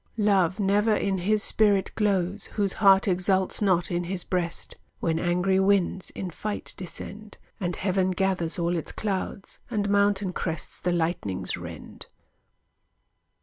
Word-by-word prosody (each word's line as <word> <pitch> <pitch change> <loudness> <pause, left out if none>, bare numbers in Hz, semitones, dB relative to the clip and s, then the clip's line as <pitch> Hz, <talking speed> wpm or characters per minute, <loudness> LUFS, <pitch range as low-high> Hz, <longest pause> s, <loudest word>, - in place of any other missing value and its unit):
Love 195 -3 +2
never 205 +2 +3
in 195 -2 0
his 210 +4 +2
spirit 205 -3 +3
glows, 200 -2 +1
Whose 200 -3 +1
heart 195 0 +6
exults 185 +1 +1
not 185 -4 +2
in 175 0 -1
his 180 0 -3
breast, 175 -2 -3 0.2
When 165 -1 0
angry 180 +2 +2
winds 190 -1 +2
in 185 -2 -4
fight 210 +5 -4
descend, 205 +3 -8 0.2
And 175 -3 -2
heaven 190 -1 +1
gathers 185 -3 0
all 170 0 0
its 165 - -3
clouds, 195 -1 -4
And 205 -4 -1
mountain 200 -2 +2
crests 160 -4 -4
the 180 - -1
lightnings 160 - -1
rend. - - -9
190 Hz, 140 wpm, -26 LUFS, 175-200 Hz, 0.2 s, heart